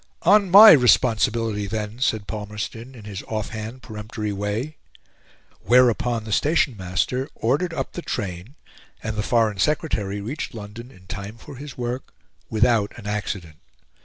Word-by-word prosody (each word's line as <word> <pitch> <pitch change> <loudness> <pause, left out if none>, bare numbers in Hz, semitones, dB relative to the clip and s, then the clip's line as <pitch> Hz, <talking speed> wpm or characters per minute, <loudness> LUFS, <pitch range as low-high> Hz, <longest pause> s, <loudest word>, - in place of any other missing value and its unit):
"On 200 +2 +5
MY 210 +4 +11
responsibility, 115 -5 +3
then!" 105 +2 -4
said 110 -5 0
Palmerston, 110 +4 -6
in 110 -4 -12
his 100 -1 -6
off 110 -1 -3
hand, 110 +3 -7
peremptory 105 -1 -5
way 105 +10 -3 0.8
whereupon 120 -2 +3
the 110 - -7
station 145 -1 +2
master 100 +8 -2
ordered 145 +10 0
up 165 - -4
the 175 - -5
train 100 - -5 0.5
and 110 -1 -3
the 105 - -1
Foreign 110 -2 +1
Secretary 105 -7 0
reached 120 +6 -5
London 110 +3 -9
in 95 -7 -18
time 100 +3 -7
for 135 - -11
his 140 0 -9
work, 125 +1 -5 0.3
without 110 -2 +2
an 110 - -11
accident. 100 -6 -4
110 Hz, 145 wpm, -23 LUFS, 105-125 Hz, 0.8 s, MY